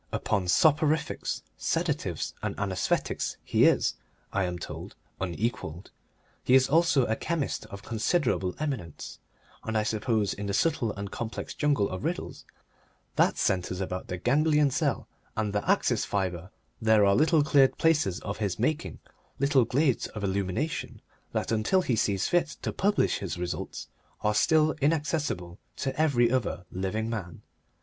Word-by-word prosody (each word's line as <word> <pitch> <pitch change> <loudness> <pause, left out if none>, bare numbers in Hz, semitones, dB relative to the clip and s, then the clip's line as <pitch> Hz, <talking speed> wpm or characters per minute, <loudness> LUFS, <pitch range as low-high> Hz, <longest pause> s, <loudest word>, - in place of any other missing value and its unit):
Upon 100 -3 0
soporifics, 155 - +2 0.2
sedatives, - - -1
and - - -3
anaesthetics 95 -3 -1
he - - +3
is, - - +3 0.4
I 95 -1 +1
am 90 -1 -3
told, 85 - -8 0.2
unequalled. 95 -2 -3 0.5
He 125 - +4
is 130 0 +5
also 160 -4 +4
a 110 - 0
chemist 160 +1 -2
of 100 0 -9
considerable 115 - 0
eminence, 130 - -5 0.4
and 110 -1 -1
I 105 - +2
suppose 110 -1 0
in 100 0 -5
the 100 - -1
subtle 150 -8 +1
and 100 -1 -6
complex 115 -1 -5
jungle 145 -9 +1
of 95 0 -6
riddles - - -4 0.7
that - - +3
centres 90 -1 0
about 90 -1 -4
the 90 - -4
ganglion 150 - +3
cell - - 0 0.3
and 105 -2 -1
the 105 - -2
axis - - +2
fibre 90 -2 -2 0.3
there 110 -2 +5
are 100 - +5
little 155 +2 +4
cleared 140 -2 +4
places 155 - +2
of 100 - -4
his 100 -4 -1
making, 155 +8 -1 0.4
little 140 -2 +3
glades 135 +2 +1
of 105 - -7
illumination, 100 - -2 0.3
that, - - -2
until 115 - +2
he 125 - +1
sees 100 -3 +1
fit 170 -3 +1
to - - -2
publish 205 +1 +1
his 95 -2 -4
results, 90 0 -4 0.3
are 105 - +2
still 155 +7 +4
inaccessible 145 - -1 0.2
to 135 -1 -3
every 130 -6 +3
other 115 -8 -1
living 95 +4 -2
man. 105 -7 -5
110 Hz, 150 wpm, -28 LUFS, 95-150 Hz, 0.7 s, is